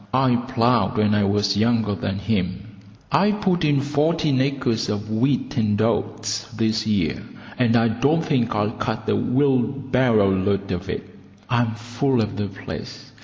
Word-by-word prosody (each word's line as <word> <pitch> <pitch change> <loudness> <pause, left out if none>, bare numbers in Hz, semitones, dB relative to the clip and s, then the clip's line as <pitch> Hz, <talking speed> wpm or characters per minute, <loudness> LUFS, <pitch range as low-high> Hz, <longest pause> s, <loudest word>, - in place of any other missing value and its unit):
I 130 -2 +3
ploughed 120 -1 +1
when 105 0 +2
I 105 -1 +2
was 100 0 +1
younger 110 -1 +1
than 95 -1 -3
him. 100 0 -3 0.3
I 200 +3 +4
put 190 -4 0
in 145 -2 +2
fourteen 150 -1 +1
acres 130 -4 -1
of 105 +1 -3
wheat 130 +5 0
and 105 -2 +1
oats 110 0 -1
this 110 -1 0
year, 90 - 0 0.4
and 120 -2 +3
I 115 0 +4
don't 140 +8 +1
think 125 -8 0
I'll 105 0 0
cut 110 0 -4
a - - +2
wheelbarrow 130 -5 +2
load 100 +1 -1
of 90 +1 -4
it. - - -4 0.4
I'm 120 -2 +1
full 120 +3 -1
of 105 -2 -1
the 100 0 -2
place. 95 0 -9
115 Hz, 160 wpm, -22 LUFS, 105-130 Hz, 0.4 s, I